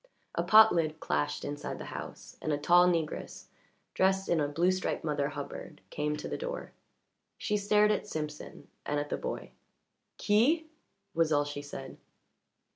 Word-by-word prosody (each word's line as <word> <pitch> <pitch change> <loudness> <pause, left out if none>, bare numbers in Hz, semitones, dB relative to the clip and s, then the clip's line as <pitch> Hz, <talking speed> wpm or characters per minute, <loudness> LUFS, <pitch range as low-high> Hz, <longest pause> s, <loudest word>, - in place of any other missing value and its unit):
A - - 0
pot 220 0 +7
lid 155 -2 0
clashed 75 0 -1
inside 145 0 -4
the - - -7
house, - - -8
and 155 - -1
a 145 - +1
tall 175 +4 +5
negress, 165 -3 -2 0.5
dressed 190 +1 +2
in 170 - +3
a 145 - +1
blue 170 +6 +2
striped 185 0 -2
Mother 145 -2 0
Hubbard, 150 +2 -7
came 150 0 -1
to - - -6
the - - -4
door. - - -5 0.7
She 210 - -1
stared 210 +1 +4
at 210 - -1
Simpson 150 -4 -6 0.2
and 145 0 -1
at 145 0 -4
the - - -1
boy. - - -5 0.7
"Qui?" 260 +11 +3 0.5
was 165 -1 +2
all 145 -1 +3
she 145 0 -5
said. 135 -2 -8
160 Hz, 165 wpm, -30 LUFS, 145-195 Hz, 0.7 s, pot